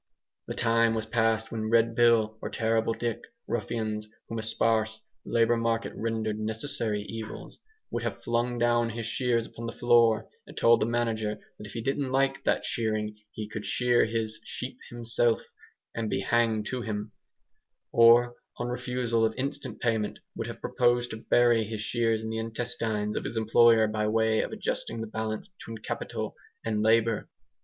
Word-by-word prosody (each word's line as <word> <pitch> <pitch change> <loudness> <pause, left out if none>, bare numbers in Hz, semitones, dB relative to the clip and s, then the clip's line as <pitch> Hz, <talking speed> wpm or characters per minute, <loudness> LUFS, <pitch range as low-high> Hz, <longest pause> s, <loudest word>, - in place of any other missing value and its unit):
The - - -4
time 115 -1 +3
was 110 -1 -2
passed 110 0 +1
when 110 -1 -2
Red 115 0 +4
Bill 115 -2 +4
or - - -4
Terrible 115 0 +1
Dick 120 -2 -2 0.2
(ruffians 110 -1 -2 0.2
whom 115 - -4
a - - -2
sparse 110 0 0 0.2
labour 115 0 +3
market 115 0 0
rendered 110 -1 -2
necessary 110 -1 -1
evils) 110 0 -8 0.3
would 120 - -2
have 115 -4 -4
flung 120 +1 0
down 120 0 +2
his 115 0 -4
shears 115 0 +1
upon 115 0 -8
the - - -5
floor 120 -2 +4 0.2
and - - -13
told 115 0 +5
the 110 - +2
manager 115 -3 0
that 105 - -14
if 100 - -11
he 115 - -3
didn't 135 +1 -1
like 135 +1 +1
that - - +1
shearing 110 -2 -1 0.2
he 105 0 -6
could 105 0 -6
shear 120 +4 +3
his 110 -1 -2
sheep - - -6
himself 120 -1 +1 0.5
and 115 -2 -2
be 95 - 0
hanged 110 0 +2
to 125 +2 -3
him; 105 -2 -4 0.8
or, 120 +1 +6 0.2
on 120 0 -3
refusal 125 -2 0
of 110 0 +1
instant 140 -3 -3
payment, 110 -3 0 0.2
would - - -4
have - - -8
proposed 120 0 +1
to 110 - -4
bury 120 0 +3
his 110 0 -5
shears 115 -1 0
in 110 - -3
the 110 - -2
intestines 110 -2 -2
of - - -2
his 115 - -4
employer 110 0 +5
by 105 0 -1
way 110 0 +2
of - - -4
adjusting 115 - -3
the 110 - -3
balance 110 - -4
between 115 -12 -9
Capital - - -4 0.3
and 110 -2 0
Labour. 115 0 +2
115 Hz, 170 wpm, -28 LUFS, 110-120 Hz, 0.8 s, or